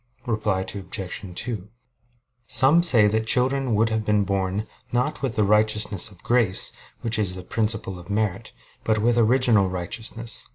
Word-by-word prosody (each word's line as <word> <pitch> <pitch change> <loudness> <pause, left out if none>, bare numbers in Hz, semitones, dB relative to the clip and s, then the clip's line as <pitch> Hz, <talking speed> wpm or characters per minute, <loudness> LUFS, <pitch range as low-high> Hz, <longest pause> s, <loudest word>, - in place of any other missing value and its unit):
Reply 110 -5 -1
Obj. 95 -2 -6
2: 110 -4 -5 0.8
Some 145 +6 +4
say 120 -11 +5
that 110 +2 0
children 130 0 +2
would 110 +2 +2
have 110 -1 -1
been 105 -1 +2
born, 100 +1 -1 0.3
not 125 +5 -1
with 130 -4 -2
the 105 - +2
righteousness 105 -1 +2
of 100 -4 -17
grace, 115 -6 +1 0.3
which 115 0 -1
is 95 -3 +2
the 90 - -8
principle 105 -2 -2
of 90 +2 -14
merit, 105 +1 -2 0.3
but 110 -1 +1
with 120 +2 +2
original 115 -4 +3
righteousness. 110 +6 -3
110 Hz, 155 wpm, -24 LUFS, 100-115 Hz, 0.8 s, say